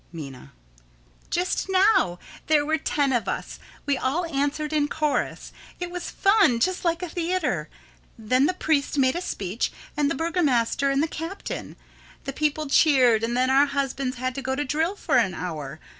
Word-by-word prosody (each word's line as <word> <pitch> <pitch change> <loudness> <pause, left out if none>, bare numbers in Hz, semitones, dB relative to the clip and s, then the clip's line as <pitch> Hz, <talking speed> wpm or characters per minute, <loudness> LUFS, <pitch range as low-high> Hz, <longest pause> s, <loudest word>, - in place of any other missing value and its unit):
Minna: 135 - -9 0.8
Just 360 +2 -1
now. 380 - +3 0.3
There 300 -1 +3
were 315 +1 +1
ten 280 -1 0
of 240 - 0
us. - - -4 0.3
We 285 -2 +1
all 315 +7 0
answered 300 0 -2
in 295 -1 +2
chorus. 300 0 -2 0.3
It 355 -1 -4
was 360 -1 -5
fun 390 - +3
just 370 +9 0
like 340 0 0
a 360 - -4
theater. 355 +2 -1 0.5
Then 255 +5 +2
the 365 - -1
priest 295 -4 0
made 260 -1 +3
a 350 - -2
speech, 200 - -3 0.2
and 290 -1 +1
the - - -1
burgomaster 280 -5 +1
and 275 +2 +2
the - - +1
captain. 330 +5 -6 0.5
The 275 - -5
people 305 +1 0
cheered, 260 -6 +4
and 235 +1 -1
then 255 +1 +2
our 275 +2 +5
husbands 275 -2 -2
had 255 +1 -2
to 275 - -5
go 265 0 -2
to 290 +2 -2
drill 320 +7 0
for 305 -9 +1
an 195 -7 +2
hour. 155 -5 -5
285 Hz, 175 wpm, -25 LUFS, 255-330 Hz, 0.8 s, our